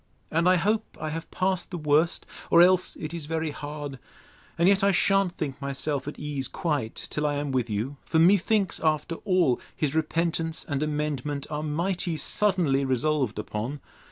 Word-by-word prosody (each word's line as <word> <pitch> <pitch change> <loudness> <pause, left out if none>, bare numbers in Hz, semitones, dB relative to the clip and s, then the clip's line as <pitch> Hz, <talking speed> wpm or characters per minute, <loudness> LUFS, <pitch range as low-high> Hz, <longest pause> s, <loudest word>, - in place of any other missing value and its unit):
And 165 +3 +3
I 185 - +6
hope 210 +5 0
I 155 - -3
have 165 +1 -5
passed 185 -1 -1
the 180 - -4
worst; 155 +2 +2 0.2
or 170 +1 +7
else 185 0 +3
it 155 +1 -6
is 165 -3 -5
very 160 -1 -1
hard. 145 -2 -6 0.6
And 170 - +4
yet 195 0 +4
I 200 - +5
shan't 195 -1 +3
think 140 -2 -4
myself 140 +1 -2
at 145 - -5
ease 145 -3 -3
quite, 145 -10 -2
till 150 0 0
I 145 - 0
am 145 -1 -2
with 125 -3 0
you: 110 +7 -3
For, 160 - -1
methinks, 195 +3 +3
after 155 +1 0
all, 180 -10 +3
his 145 -3 -1
repentance 165 0 -1
and 140 -2 -2
amendment 150 -2 -2
are 150 0 -2
mighty 170 +2 -1
suddenly 175 -9 +2
resolved 135 -2 0
upon. 110 +6 -4
155 Hz, 175 wpm, -26 LUFS, 145-175 Hz, 0.6 s, or